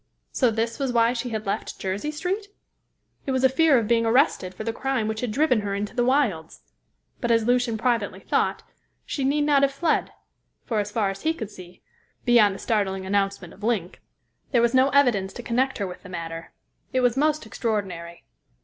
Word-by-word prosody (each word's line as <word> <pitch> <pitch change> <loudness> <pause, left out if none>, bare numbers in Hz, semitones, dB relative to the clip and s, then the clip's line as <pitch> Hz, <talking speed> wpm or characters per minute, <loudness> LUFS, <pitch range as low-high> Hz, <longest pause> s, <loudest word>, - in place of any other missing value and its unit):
So 255 - +2
this 230 +2 -2
was 270 -2 0
why 235 0 +3
she 245 0 -3
had 220 -1 -4
left 195 - -3
Jersey 195 +9 -3
Street? 360 +7 -3 0.8
It - - 0
was 260 0 0
a 265 - +6
fear 285 +1 +4
of 225 -3 0
being 230 0 +3
arrested 225 - +2
for 215 - -6
the 225 +1 -2
crime 260 -3 -1
which 220 0 -3
had 250 - -2
driven 255 -2 +2
her 200 -1 -3
into 205 +3 -4
the 245 - +2
wilds. 240 - 0 0.6
But, 240 - -2
as 230 -1 +3
Lucian 245 -1 +2
privately 230 -2 0
thought, - - 0 0.4
she 275 - -3
need 290 +2 +2
not 290 -2 +4
have 280 0 +3
fled, 310 +3 0 0.5
for 215 -3 0
so 205 - -9
far 205 -3 0
as 195 - -9
he 320 +1 0
could 220 -8 -6
see 180 -3 -13 0.4
beyond 225 -5 +5
the - - -7
startling 195 -4 -1
announcement 195 -2 -1
of - - -18
Link, 210 -6 -2 0.5
there 245 - +3
was 235 +1 +2
no 260 +1 +5
evidence 240 -10 +2
to 240 - -8
connect 260 +4 0
her 200 - -2
with 180 -1 -8
the 185 - -12
matter. 165 -2 -6 0.4
It 255 - +1
was 245 -1 +3
most 305 0 +1
extraordinary. 195 -7 -4
230 Hz, 205 wpm, -24 LUFS, 200-265 Hz, 0.8 s, a